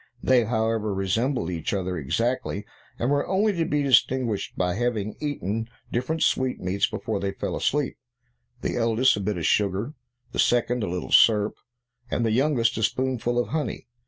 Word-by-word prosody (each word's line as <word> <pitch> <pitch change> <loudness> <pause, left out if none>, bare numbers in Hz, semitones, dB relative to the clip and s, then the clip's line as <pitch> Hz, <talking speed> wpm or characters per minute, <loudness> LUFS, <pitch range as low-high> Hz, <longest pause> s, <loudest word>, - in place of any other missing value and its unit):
They, 125 -3 +4
however, 110 -2 0
resembled 95 +1 0
each 85 +3 -2
other 95 -1 -2
exactly, 105 - -1 0.3
and 120 +4 0
were 145 0 +1
only 205 +3 +2
to 170 -3 0
be 150 -1 0
distinguished 125 -4 +2
by 90 -1 +1
their 120 +6 -1
having 110 -4 -2
eaten 115 - -3 0.2
different 140 +7 -1
sweetmeats 100 -7 +1
before 110 -3 -3
they 100 0 -2
fell - - -3
asleep; 145 -1 -1 0.6
the - - -2
eldest 115 +2 +3
a - - -4
bit 100 -1 -2
of 85 - -3
sugar; 105 +6 +1 0.4
the - - -5
second 120 0 +2
a 100 - -2
little 90 +1 -4
syrup; 105 -2 +5 0.6
and 115 - 0
the 110 - +1
youngest 120 -2 +2
a - - -2
spoonful 120 +1 0
of 120 - 0
honey. 150 -7 -3
115 Hz, 170 wpm, -25 LUFS, 100-130 Hz, 0.6 s, syrup